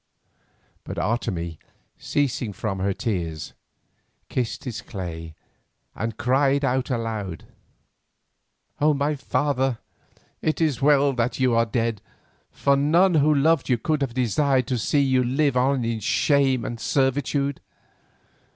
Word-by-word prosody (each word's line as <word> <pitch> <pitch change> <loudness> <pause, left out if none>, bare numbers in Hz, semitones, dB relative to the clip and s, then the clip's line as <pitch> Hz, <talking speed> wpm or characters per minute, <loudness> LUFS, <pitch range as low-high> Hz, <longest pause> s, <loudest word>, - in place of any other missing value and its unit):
But - - -7
Otomie, 85 -8 -2 0.4
ceasing 125 -6 -1
from 95 -1 -3
her 100 +1 0
tears, 85 -7 -3 0.8
kissed 120 -3 -2
his 120 -4 -5
clay 80 -4 -7 0.6
and 110 0 -4
cried 135 +2 +2
aloud: 115 - -2 1.3
"O 150 0 +3
my 145 +2 0
father, 135 -3 0 0.6
it 155 - 0
is 155 -8 +1
well 140 -1 +4
that 120 +1 -1
you 130 -2 +3
are 115 0 +3
dead, 115 -2 -1 0.5
for 140 - +1
none 165 +7 +3
who 155 -1 +4
loved 150 0 +2
you 125 - +3
could 140 +1 -1
desire 130 +2 +2
to 125 +1 -2
see 140 +6 +2
you 130 -2 +2
live 135 +2 +1
on 130 0 +2
in 115 -1 -1
shame 135 +3 +2
and 115 - -5
servitude. 135 +2 0
130 Hz, 125 wpm, -24 LUFS, 115-140 Hz, 1.3 s, well